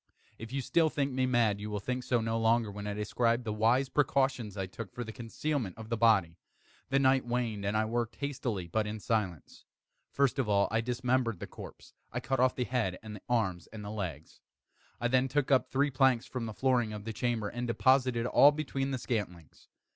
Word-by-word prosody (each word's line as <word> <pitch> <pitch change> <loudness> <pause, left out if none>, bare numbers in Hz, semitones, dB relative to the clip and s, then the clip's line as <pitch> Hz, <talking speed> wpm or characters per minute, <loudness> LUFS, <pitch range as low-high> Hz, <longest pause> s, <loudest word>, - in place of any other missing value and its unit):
If 115 - -7 0.2
still 165 -2 +3
you - - 0
think 140 -2 -1
me 130 0 +1
mad, 115 -5 +2
you 105 - -5
will 105 -1 -2
think 125 +5 -3
so 120 -2 +1
no 115 0 -1
longer 115 -1 +2
when 105 +1 -6
I 105 - -3
describe 115 +3 0
the 110 -2 -3
wise 115 +5 +3
precautions 130 -6 0
I 95 - -1
took 95 +1 -8
for 120 - -5
the 110 - -7
concealment 120 - -3
of 110 -1 -9
the 115 - 0
body. 100 -7 +3 0.5
The 135 - +2
night 130 -1 +4
waned, 120 -4 -2
and 100 +2 0
I 110 - +2
worked 120 +1 -2
hastily, 125 -9 -3
but 105 +5 0
in 110 +1 -4
silence. 100 -8 -3 0.5
First 140 -1 +1
of 120 -5 0
all 100 -1 +3
I 110 +1 +2
dismembered 125 -3 0
the - - -5
corpse. - - -12 0.2
I 125 - -2
cut 135 +1 -1
off 130 0 +3
the 125 - 0
head 120 -8 -1
and 110 -1 -7
the 105 - -11
arms 95 -8 0
and 105 -2 -9
the 105 - -5
legs. 85 -8 -6 0.6
I 120 - +1
then 130 +1 +3
took 145 +1 0
up 130 -1 +4
three 140 +2 +1
planks 130 -3 +3
from 125 -3 -4
the 110 - -5
flooring 125 -4 +1
of 105 -1 -7
the 115 - -4
chamber, 115 -2 -1
and 120 +3 -4
deposited 130 -1 +3
all 140 +3 +7
between 140 -2 -2
the 135 - -1
scantlings. 100 - -5
115 Hz, 215 wpm, -31 LUFS, 105-130 Hz, 0.6 s, all